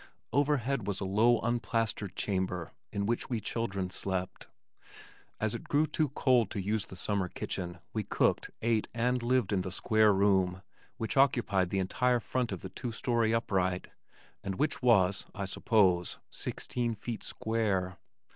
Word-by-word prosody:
Overhead 140 -5 +1
was 100 -1 -1
a 95 - -3
low 110 +5 +4
unplastered 115 -4 -1
chamber 95 -3 -2 0.2
in 100 -1 -1
which 120 +4 -1
we 120 -3 0
children 100 -5 -3
slept. 95 -1 -3 0.9
As 110 -1 0
it 120 - -6
grew 150 +2 +4
too 155 -1 0
cold 125 -6 +3
to 105 - -4
use 105 +2 -1
the - - -9
summer 95 +1 -1
kitchen 90 0 -5 0.2
we 110 - 0
cooked, 100 - +1
ate 115 -2 +2
and 125 +2 +1
lived 120 -4 +1
in 95 - +2
the 95 0 -4
square 110 +3 +3
room 95 -2 +2 0.3
which 110 +3 -3
occupied 115 -9 +3
the 95 - -1
entire 120 +6 +2
front 125 0 -2
of 95 - -4
the 95 - -5
two 115 +6 -5
story 115 0 +1
upright, 95 -5 0 0.5
and 95 - -3
which 145 +6 0
was, 100 -6 +3
I 100 0 -3
suppose, 95 -4 +2
sixteen 120 -2 -2
feet 115 +2 -5
square. 100 -5 -1
110 Hz, 155 wpm, -31 LUFS, 95-120 Hz, 0.9 s, low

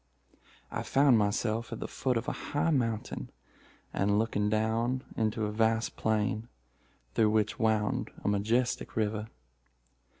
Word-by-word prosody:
"I - - -2
found 135 -4 +4
myself 110 +3 0
at 115 - -5
the - - -4
foot 125 -3 0
of 115 +4 -3
a - - +1
high 145 +3 -1
mountain, 115 -7 -1 0.6
and 100 +1 +2
looking 105 -2 +1
down 115 +4 +1
into 110 0 0
a 105 - -2
vast 110 +1 +1
plain, 110 +1 0 0.7
through 110 - +4
which 110 +1 +1
wound 110 -2 +1
a - - -2
majestic 115 +5 0
river. 110 0 -1
110 Hz, 135 wpm, -30 LUFS, 105-120 Hz, 0.7 s, found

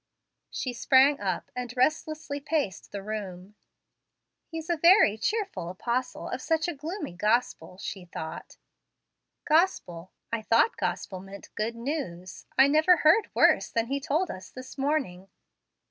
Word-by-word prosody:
She 255 - -4
sprang 265 +4 +4
up, 195 -2 -3
and 250 0 -5
restlessly 310 +1 0
paced 285 - -2
the 200 -1 -6
room. 200 -2 -6 0.9
"He's 325 -1 -7
a 345 - +1
very 335 - +6
cheerful 400 - -2
apostle 240 +7 -3
of 250 - -4
such 320 +2 0
a 345 - -2
gloomy 315 - -6
gospel," 210 -3 0
she 190 -1 -6
thought. 160 -2 -8 0.9
"Gospel! 300 - +1 0.2
I 230 - 0
thought 230 - +3
'gospel' 185 - -3
meant 195 +1 -12
'good 225 +2 -2
news.' 230 - -5
I 265 - +8
never 315 +5 +5
heard 320 +8 +4
worse - - +4
than 230 -1 0
he 275 +4 -2
told 315 +5 0
us 185 0 -9
this 255 0 -10
morning. 270 -10 -2
250 Hz, 140 wpm, -27 LUFS, 195-310 Hz, 0.9 s, I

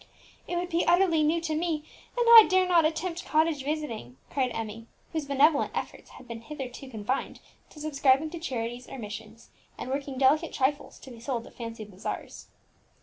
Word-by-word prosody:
"It 355 - -3
would 350 +1 -2
be 335 0 +1
utterly 345 -2 +4
new 310 +3 +2
to 320 -2 -2
me, 315 -1 -1 0.3
and 485 - +2
I 460 -2 +11
dare 370 0 +4
not 340 -3 +5
attempt 335 +2 -2
cottage 310 -2 +1
visiting!" 265 - -4
cried 260 -3 +1
Emmie, 225 0 -5 0.3
whose 315 -3 -2
benevolent 285 +2 +3
efforts - - -5
had 255 - -14
hitherto 245 +2 -7
been - - -11
confined 225 +2 -3 0.3
to 300 - -14
subscribing 290 0 +2
to 340 - -6
charities 245 -5 -4
or - - -7
missions, 220 0 -9 0.3
and 255 - -5
working 275 -1 -3
delicate 290 +5 +3
trifles 280 +2 -1
to 265 - -11
be 235 - -11
sold 235 -1 -3
at - - -14
fancy 230 -2 -7
bazaars. 195 -2 -7
280 Hz, 180 wpm, -28 LUFS, 235-320 Hz, 0.3 s, I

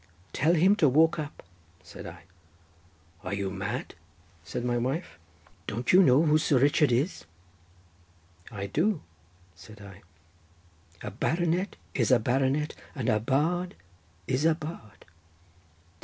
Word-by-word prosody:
'Tell 160 +5 +2
him 185 +5 +5
to 155 -9 +4
walk 160 +5 +3
up,' 150 -1 -7 0.4
said - - -10
I. 85 0 -11 1.0
'Are 95 +1 -3
you 100 -1 -3
mad?' 95 -1 -4 0.5
said 90 +9 -5
my 120 0 0
wife. 130 - -3 0.5
'Don't 120 +7 -1
you 185 - +8
know 140 -3 +5
who 155 -1 +4
Sir 150 -3 +2
Richard 145 +1 +3
is?' 130 - 0 1.3
'I 100 -3 -5
do,' 160 - 0 0.5
said 95 +6 -14
I, 100 -1 -12 1.0
'a 105 - -4
baronet 170 - -1 0.2
is - - +1
a 130 - +6
baronet, 135 +6 0 0.2
but 130 -5 -1
a 110 - +3
bard 160 - 0 0.5
is 130 - -1
a 165 0 +4
bard. 150 - -9
135 Hz, 130 wpm, -28 LUFS, 110-160 Hz, 1.3 s, you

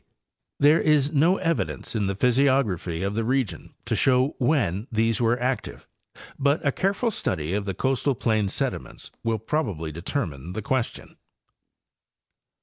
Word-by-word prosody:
There 150 +3 +5
is 150 -2 +3
no 165 +5 +3
evidence 165 -8 -2
in 105 -3 0
the 100 - -1
physiography 120 -8 +1
of 100 +1 -1
the 115 +2 -1
region 120 - -2
to - - 0
show 130 0 +3
when 120 - +1
these 115 0 +1
were 120 +1 +2
active, 125 +1 -3 0.5
but 140 +3 +1
a 140 - +3
careful 200 - 0
study 85 - -2
of 100 0 -1
the 95 -2 -3
costal 135 +3 0
plain 110 -5 +1
sediments - - -4
will 115 -1 0
probably 105 - -2
de 80 +3 -8
termine 85 - -3
the 110 +1 -4
question. 130 +1 -3
120 Hz, 145 wpm, -25 LUFS, 100-140 Hz, 0.5 s, There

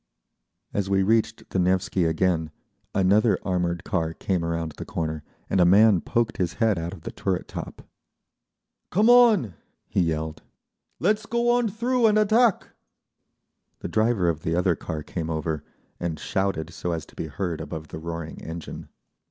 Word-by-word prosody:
As 100 -1 -1
we 95 0 +3
reached 110 +2 +1
the 95 - 0
Nevsky 90 0 +1
again 80 -1 +1 0.5
another 100 +4 +4
armoured 90 -2 -1
car 80 -6 -1
came 90 -3 -1
around 85 -1 -2
the - - -5
corner, 80 -2 -3 0.3
and 95 - +2
a - - +7
man 100 +1 +6
poked 115 -1 -1
his 90 -4 -1
head 110 -6 +1
out 85 +1 -4
of - - -10
the - - -5
turret 95 -2 -2
top. - - -7 1.1
"Come 215 +7 +4
on!" 220 - +5 0.3
he - - -1
yelled. 80 -2 -2 0.6
"Let's 210 +5 +1
go 235 +1 +2
on 240 -2 +2
through 235 +3 +2
and 215 0 +3
attack!" 215 +1 +3 1.1
The - - -3
driver 110 -4 +2
of 80 -2 0
the 80 +1 -1
other 90 0 +2
car 75 -1 -5
came 80 0 -4
over, 80 -1 -2 0.4
and 85 -2 -2
shouted 95 -4 -1
so 90 +1 -3
as 80 -2 -4
to - - -20
be - - -4
heard 90 -5 -3
above 80 -1 -7
the - - -7
roaring 85 -1 -6
engine. 80 0 -7
90 Hz, 165 wpm, -25 LUFS, 80-115 Hz, 1.1 s, a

